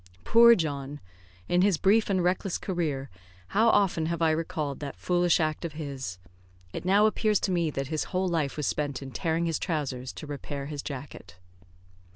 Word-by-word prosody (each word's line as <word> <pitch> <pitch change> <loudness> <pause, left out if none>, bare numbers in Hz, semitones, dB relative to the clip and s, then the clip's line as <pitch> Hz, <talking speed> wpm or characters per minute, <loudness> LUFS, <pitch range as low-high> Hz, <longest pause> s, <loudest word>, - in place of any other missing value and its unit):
Poor 235 +1 +7
John! 145 -4 -3 0.5
in 175 - +3
his 195 -3 +3
brief 210 +5 +3
and 185 -3 +1
reckless 180 +1 0
career, 150 -8 -3 0.4
how 220 +3 +4
often 185 -7 +2
have 170 0 -2
I 165 -1 +3
recalled 155 -3 -2
that 140 -2 -6
foolish 175 -1 +2
act 155 0 -1
of 165 -3 -4
his. 140 - -5 0.6
It - - -6
now 200 +3 +5
appears 215 -1 +2
to 190 - 0
me 170 -3 +1
that 135 -2 -4
his 155 -1 -1
whole 185 0 -1
life 160 -6 -1
was 150 - -1
spent 140 -3 -2
in 135 - -8
tearing 165 +6 -1
his 165 -2 -1
trousers 135 -7 -3
to - - -8
repair 145 -1 -6
his 145 0 -5
jacket. 130 - -8
160 Hz, 185 wpm, -27 LUFS, 140-180 Hz, 0.6 s, Poor